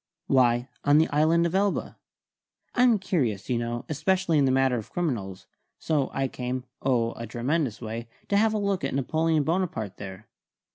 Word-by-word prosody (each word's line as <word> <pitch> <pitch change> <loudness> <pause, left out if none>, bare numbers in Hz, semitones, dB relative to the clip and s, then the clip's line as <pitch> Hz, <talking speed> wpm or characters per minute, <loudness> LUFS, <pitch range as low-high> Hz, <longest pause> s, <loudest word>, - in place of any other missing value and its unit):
"Why, 120 -2 +3 0.2
on 145 +1 +5
the 160 - +4
island 160 +3 +3
of 170 - -1
Elba. 200 +1 0 0.8
I'm 245 -3 +4
curious, 130 - -1
you 120 - +1
know, 120 +1 -3
especially 165 +2 +1
in 140 - +4
the 130 - +3
matter 130 -1 +2
of 110 - -10
criminals, 115 - -3 0.3
so 145 -4 0
I 135 0 -1
came 125 0 -4 0.2
oh, 120 -3 +1
a 115 - -6
tremendous 125 +1 -1
way 115 +1 -5 0.2
to 200 - +2
have 220 +1 +3
a - - +2
look 200 -4 -1
at 135 - -1
Napoleon 155 +3 +1
Bonaparte, 160 - -2
there. 100 +2 -9
135 Hz, 175 wpm, -26 LUFS, 120-170 Hz, 0.8 s, on